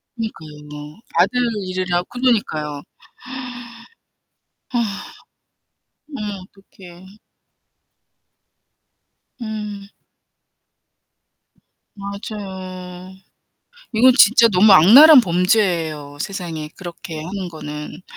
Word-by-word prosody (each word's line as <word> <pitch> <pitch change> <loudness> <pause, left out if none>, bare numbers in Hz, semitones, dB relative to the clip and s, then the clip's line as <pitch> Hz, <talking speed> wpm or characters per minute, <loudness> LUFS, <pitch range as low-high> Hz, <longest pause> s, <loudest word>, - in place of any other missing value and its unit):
그러니까요. 150 -6 -8 0.2
아들 250 - +3 0.3
일이라 185 -1 -1
그러니까요. 155 - -1 1.9
아 220 -4 -3 1.0
어머 205 -3 -5
어떡해. 190 +1 -17 2.2
음. 210 -3 -6 2.1
맞아요. 190 -3 -8 0.8
이건 250 +4 +5
진짜 230 +2 +7
너무 200 +1 +5
악랄한 255 - +9
범죄예요, 170 -6 0
세상에 165 -6 -5
그렇게 175 -2 -9
하는 185 +2 -5
거는. 150 +1 -8
185 Hz, 160 characters per minute, -19 LUFS, 165-210 Hz, 2.2 s, 악랄한